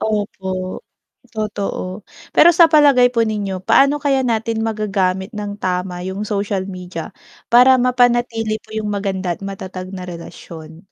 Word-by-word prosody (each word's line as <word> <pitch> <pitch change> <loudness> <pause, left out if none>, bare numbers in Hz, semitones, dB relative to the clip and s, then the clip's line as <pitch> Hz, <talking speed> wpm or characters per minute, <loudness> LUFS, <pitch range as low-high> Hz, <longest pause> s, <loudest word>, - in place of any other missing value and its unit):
Opo. 190 -3 -3 0.5
Totoo. 205 -2 -4 0.3
Pero 345 - +7
sa 340 0 +6
palagay 290 -5 +5
po 230 - +3
ninyo, 205 -4 -3
paano 280 +7 +3
kaya 270 -3 +1
natin 225 -1 -1
magagamit 200 -3 -1
nang 205 -2 -5
tama 180 -2 -3
yung 190 +3 -4
social 200 -2 -2
media? 180 -3 -7 0.3
Para 255 +2 +6
mapanatili 240 -3 +1
po 220 0 -14
yung 215 -1 -2
maganda 195 -3 -2
at - - -25
matatag 190 -1 -7
na 185 - -6
relasyon? 165 -2 -10
205 Hz, 135 wpm, -18 LUFS, 185-230 Hz, 0.5 s, Pero